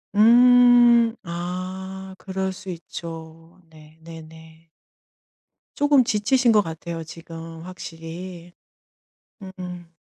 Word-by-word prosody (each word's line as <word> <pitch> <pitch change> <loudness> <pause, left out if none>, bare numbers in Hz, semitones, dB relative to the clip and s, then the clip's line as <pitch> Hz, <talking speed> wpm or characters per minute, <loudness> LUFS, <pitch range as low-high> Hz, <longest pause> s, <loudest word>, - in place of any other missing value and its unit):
음. 240 +1 +6
아 185 +2 -6
그럴 190 -1 -4
수 185 +1 -10
있죠. 165 0 -9
네 155 0 -18
네 165 0 -10
네. 160 +1 -16 1.1
쪼금 285 -3 +4
지치신 235 +2 +2
것 210 -1 +5
같아요 165 -1 -6
지금 165 0 -10
확실히. 175 0 -9 0.9
음음. 180 -3 -9
180 Hz, 155 characters per minute, -23 LUFS, 165-205 Hz, 1.1 s, 음